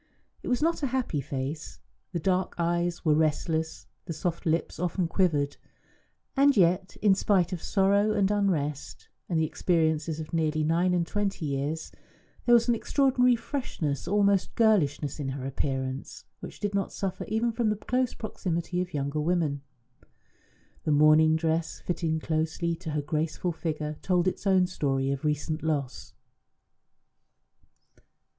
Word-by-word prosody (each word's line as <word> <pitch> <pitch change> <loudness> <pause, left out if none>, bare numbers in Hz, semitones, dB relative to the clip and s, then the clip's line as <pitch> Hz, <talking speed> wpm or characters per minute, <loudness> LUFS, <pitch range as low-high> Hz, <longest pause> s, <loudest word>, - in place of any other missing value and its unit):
It - - -8
was 250 +3 +1
not 330 0 +1
a 280 - +1
happy 250 - -1
face; 140 +3 -5 0.3
the 180 - -2
dark 185 +2 0
eyes 175 0 -1
were 155 - +5
restless, 160 +1 0 0.2
the 170 - -4
soft 170 +2 -3
lips 160 0 0
often 180 0 0
quivered. 155 -5 +1 0.8
And 280 -2 +4
yet, 185 +1 +2
in 205 -2 +6
spite 190 -2 +2
of 175 - -4
sorrow 200 +2 +2
and 205 -2 +2
unrest, 160 -9 -1 0.2
and 165 -3 +1
the 160 - +2
experiences 160 -1 0
of 155 +1 -7
nearly 155 -1 +1
nine 170 +3 +2
and 170 -1 +1
twenty 200 -2 -2
years, 145 +3 -3 0.6
there 240 - +7
was 235 0 +3
an 240 - +4
extraordinary 250 0 +3
freshness, 200 - -3
almost 200 -1 +2
girlishness, 160 - +2
in 140 -2 -2
her 135 -1 -5
appearance, 135 0 -3
which - - -9
did 205 -1 -2
not 200 -1 -1
suffer 195 -2 -3
even 225 +2 0
from 230 -1 0
the 215 - +1
close 250 +4 -1
proximity 180 -4 -3
of 180 -3 -5
younger 140 +1 -1
women. 155 -4 0 1.2
The 155 - 0
mourning 155 +2 +6
dress, 160 0 -1
fitting 165 -2 -1
closely 160 +2 -1
to 160 - -7
her 150 -1 -1
graceful 155 +4 -1
figure, 155 -2 -4
told 180 -1 +1
its 185 - -2
own 190 -2 +5
story 135 -6 -1
of 140 -1 -3
recent 150 +1 -1
loss. 145 -5 -3
170 Hz, 150 wpm, -28 LUFS, 155-195 Hz, 1.2 s, there